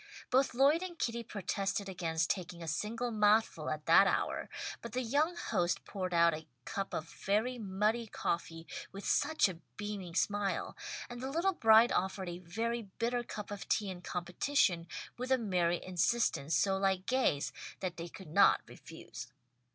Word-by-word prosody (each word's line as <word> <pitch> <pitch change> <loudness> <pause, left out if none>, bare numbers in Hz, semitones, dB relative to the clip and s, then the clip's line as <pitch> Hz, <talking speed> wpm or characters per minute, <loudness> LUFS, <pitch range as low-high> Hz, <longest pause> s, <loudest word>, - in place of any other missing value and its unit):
Both 260 0 +3
Lloyd 280 +6 +5
and 365 -2 -6
Kitty 235 -4 -1
protested 200 -2 -2
against 165 -4 -1
taking 175 -2 -4
a - - -7
single 225 +9 -2
mouthful 210 -6 +3
at 155 0 -4
that 195 +4 +7
hour, - - 0 0.3
but 235 -2 -8
the 255 +1 0
young 295 +9 +1
host 180 - 0
poured 185 -3 -4
out 170 -1 +5
a 155 0 -7 0.2
cup 195 -1 -3
of 160 - -3
very 220 +8 -1
muddy 215 +3 0
coffee 165 -4 -3 0.3
with 195 +1 -8
such 315 -7 +3
a 180 -4 -7 0.2
beaming 200 -5 -5
smile, 205 0 0 0.3
and 240 0 -8
the 265 - -3
little 340 +7 +1
bride 225 -4 +6
offered 190 0 -1
a 175 0 -6
very 225 +7 -2 0.2
bitter 240 +1 0
cup 210 -3 -7
of 205 -1 -6
tea 205 -3 +1
in 180 -1 -8
competition, 180 0 0 0.3
with 255 +1 -3
a 260 - +6
merry 180 -6 +1
insistence 180 -4 +1
so 190 +3 +2
like 190 -1 +1
Gay's, 255 - +1 0.3
that 185 -2 -3
they 170 0 -5
could 185 -1 -11
not - - +6
refuse. - - -10
200 Hz, 165 wpm, -33 LUFS, 175-235 Hz, 0.3 s, that